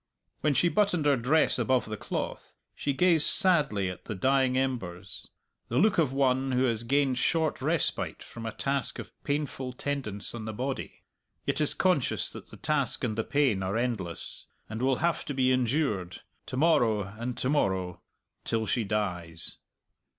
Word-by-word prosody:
When 150 Hz, -1 st, +1 dB
she 175 Hz, -, +4 dB
buttoned 180 Hz, -4 st, +2 dB
her 145 Hz, -1 st, +5 dB
dress 135 Hz, +6 st, +2 dB
above 130 Hz, -2 st, +2 dB
the 110 Hz, -, -4 dB
cloth, -, -, -5 dB, 0.2 s
she 145 Hz, -, -2 dB
gazed 165 Hz, +1 st, +5 dB
sadly 150 Hz, -, +2 dB
at 90 Hz, -1 st, -7 dB
the 110 Hz, -, -4 dB
dying 130 Hz, +4 st, +2 dB
embers 95 Hz, -9 st, -3 dB, 0.4 s
the 120 Hz, -, -2 dB
look 205 Hz, +4 st, +4 dB
of 150 Hz, -6 st, +3 dB
one 135 Hz, -1 st, +1 dB
who 125 Hz, +1 st, +2 dB
has 115 Hz, -3 st, 0 dB
gained 135 Hz, +1 st, +2 dB
short 160 Hz, -4 st, +1 dB
respite 155 Hz, +2 st, -1 dB
from 115 Hz, -1 st, -8 dB
a -, -, -2 dB
task 135 Hz, +3 st, -2 dB
of -, -, -8 dB
painful 140 Hz, -3 st, -2 dB
tendance 125 Hz, -7 st, -4 dB
on 115 Hz, -2 st, -6 dB
the 110 Hz, -, -4 dB
body, 130 Hz, +5 st, -4 dB, 0.4 s
yet -, -, 0 dB
is 150 Hz, -, +2 dB
conscious 180 Hz, -9 st, +1 dB
that -, -, -10 dB
the -, -, -13 dB
task 140 Hz, -5 st, 0 dB
and 110 Hz, -4 st, 0 dB
the 115 Hz, -, 0 dB
pain 135 Hz, -9 st, +2 dB
are 95 Hz, +3 st, -1 dB
endless, 110 Hz, -9 st, -2 dB, 0.2 s
and 110 Hz, +2 st, -5 dB
will 130 Hz, +1 st, +3 dB
have 170 Hz, -, 0 dB
to 145 Hz, -, -4 dB
be 130 Hz, -1 st, +3 dB
endured, 120 Hz, -, 0 dB, 0.3 s
to 130 Hz, -, -4 dB
morrow 120 Hz, -9 st, +3 dB
and 115 Hz, +5 st, -6 dB
to -, -, -1 dB
morrow, 95 Hz, -, 0 dB, 0.4 s
till 115 Hz, -1 st, -1 dB
she 115 Hz, +1 st, 0 dB
dies. 90 Hz, -6 st, -2 dB
130 Hz, 170 wpm, -28 LUFS, 110-145 Hz, 0.4 s, her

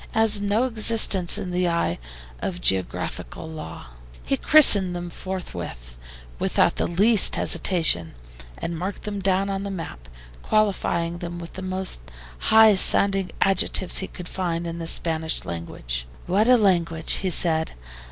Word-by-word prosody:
It -, -, -10 dB
has 220 Hz, -2 st, +3 dB
no 205 Hz, +4 st, 0 dB
existence 220 Hz, -6 st, +4 dB
in 180 Hz, -, -6 dB
the 180 Hz, 0 st, -1 dB
eye 170 Hz, -, -2 dB, 0.4 s
of 180 Hz, -2 st, -5 dB
geographical 95 Hz, -, -2 dB
law." 155 Hz, -, -9 dB, 0.4 s
He 275 Hz, -, -1 dB
christened 205 Hz, -11 st, +6 dB
them 175 Hz, 0 st, -7 dB
forthwith, 115 Hz, -, -8 dB, 0.4 s
without -, -, +1 dB
the -, -, -1 dB
least 205 Hz, +4 st, +4 dB
hesitation, 120 Hz, -, +1 dB, 0.4 s
and 165 Hz, -1 st, -6 dB
marked 185 Hz, +3 st, -6 dB
them 205 Hz, -1 st, -5 dB
down 195 Hz, +1 st, -1 dB
on 195 Hz, 0 st, -4 dB
the 200 Hz, -, -5 dB
map, 110 Hz, -, -8 dB, 0.3 s
qualifying 175 Hz, -5 st, -1 dB
them 175 Hz, 0 st, -7 dB
with 170 Hz, -1 st, -10 dB
the 190 Hz, -, -8 dB
most 185 Hz, -, -2 dB, 0.5 s
high 220 Hz, -1 st, +6 dB
sounding 195 Hz, 0 st, +3 dB
adjectives 190 Hz, -1 st, +1 dB
he 190 Hz, -, -3 dB
could 180 Hz, -2 st, -11 dB
find 170 Hz, -2 st, -4 dB
in 170 Hz, 0 st, -6 dB
the 165 Hz, -, -6 dB
Spanish 160 Hz, -1 st, -2 dB
language. -, -, -6 dB, 0.2 s
"What 200 Hz, +5 st, +1 dB
a 250 Hz, 0 st, +5 dB
language!" 170 Hz, -6 st, +1 dB
he 190 Hz, -, -2 dB
said. 160 Hz, -2 st, 0 dB
180 Hz, 150 wpm, -22 LUFS, 165-200 Hz, 0.5 s, christened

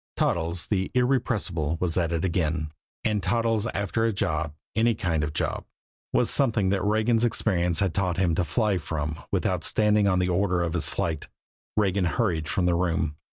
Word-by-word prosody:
Toddles, 85 Hz, 0 st, 0 dB
the 95 Hz, -3 st, -1 dB
irrepressible, 110 Hz, -, 0 dB
was 90 Hz, -3 st, 0 dB
at 85 Hz, -3 st, +1 dB
it 85 Hz, +1 st, 0 dB
again 80 Hz, -3 st, -1 dB, 0.3 s
and 105 Hz, -2 st, +1 dB
Toddles 115 Hz, +2 st, +1 dB
after 100 Hz, 0 st, -1 dB
a 115 Hz, -, +2 dB
job, 80 Hz, -6 st, -2 dB, 0.2 s
any 115 Hz, +1 st, +3 dB
kind 80 Hz, -6 st, -1 dB
of 75 Hz, -, -1 dB
a -, -, -9 dB
job, -, -, -1 dB, 0.5 s
was -, -, +2 dB
something 115 Hz, -8 st, +2 dB
that 95 Hz, -1 st, +1 dB
Regan's 110 Hz, +2 st, +2 dB
experience 90 Hz, -7 st, +1 dB
had 95 Hz, -4 st, +1 dB
taught 90 Hz, -3 st, 0 dB
him 90 Hz, -3 st, +2 dB
to 90 Hz, -, +1 dB
fly 100 Hz, +3 st, 0 dB
from 75 Hz, 0 st, -4 dB
without -, -, 0 dB
standing 105 Hz, -1 st, +2 dB
on 95 Hz, -2 st, +2 dB
the 90 Hz, 0 st, +1 dB
order 90 Hz, -1 st, +1 dB
of 85 Hz, -2 st, -2 dB
his 85 Hz, -, +2 dB
flight. 80 Hz, -3 st, -2 dB, 0.5 s
Regan 100 Hz, -3 st, +2 dB
hurried 85 Hz, -5 st, 0 dB
from 90 Hz, -, 0 dB
the 90 Hz, -, +3 dB
room. 80 Hz, -3 st, 0 dB
90 Hz, 185 wpm, -26 LUFS, 85-105 Hz, 0.5 s, any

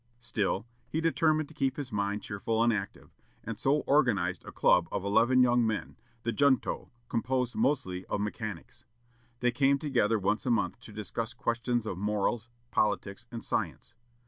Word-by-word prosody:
Still, 110 Hz, -3 st, -1 dB, 0.2 s
he 160 Hz, -, -1 dB
determined 160 Hz, -2 st, +2 dB
to -, -, -13 dB
keep 135 Hz, -3 st, 0 dB
his 140 Hz, -3 st, -5 dB
mind 100 Hz, 0 st, -1 dB
cheerful 110 Hz, +3 st, 0 dB
and 120 Hz, 0 st, +4 dB
active, 100 Hz, -2 st, -5 dB, 0.3 s
and -, -, -5 dB
so 145 Hz, +2 st, +2 dB
organized 130 Hz, -8 st, +2 dB
a -, -, -9 dB
club -, -, +4 dB
of -, -, -2 dB
eleven 115 Hz, +5 st, +5 dB
young 120 Hz, -1 st, +4 dB
men, 110 Hz, -2 st, -2 dB, 0.3 s
the 115 Hz, -, 0 dB
"Junto," 130 Hz, +3 st, +2 dB, 0.2 s
composed 125 Hz, +1 st, 0 dB
mostly 95 Hz, -11 st, 0 dB
of -, -, -1 dB
mechanics. 105 Hz, -3 st, -5 dB, 0.6 s
They 125 Hz, 0 st, +3 dB
came 135 Hz, +2 st, +3 dB
together 125 Hz, -7 st, +1 dB
once 105 Hz, +1 st, 0 dB
a -, -, +2 dB
month 115 Hz, 0 st, +1 dB
to 120 Hz, -, -12 dB
discuss 110 Hz, +2 st, -4 dB
questions 120 Hz, 0 st, -1 dB
of 95 Hz, -4 st, -4 dB
morals, 105 Hz, +3 st, 0 dB, 0.2 s
politics, 105 Hz, +1 st, 0 dB
and 115 Hz, -1 st, -6 dB
science. 80 Hz, -, -3 dB
115 Hz, 165 wpm, -30 LUFS, 105-130 Hz, 0.6 s, eleven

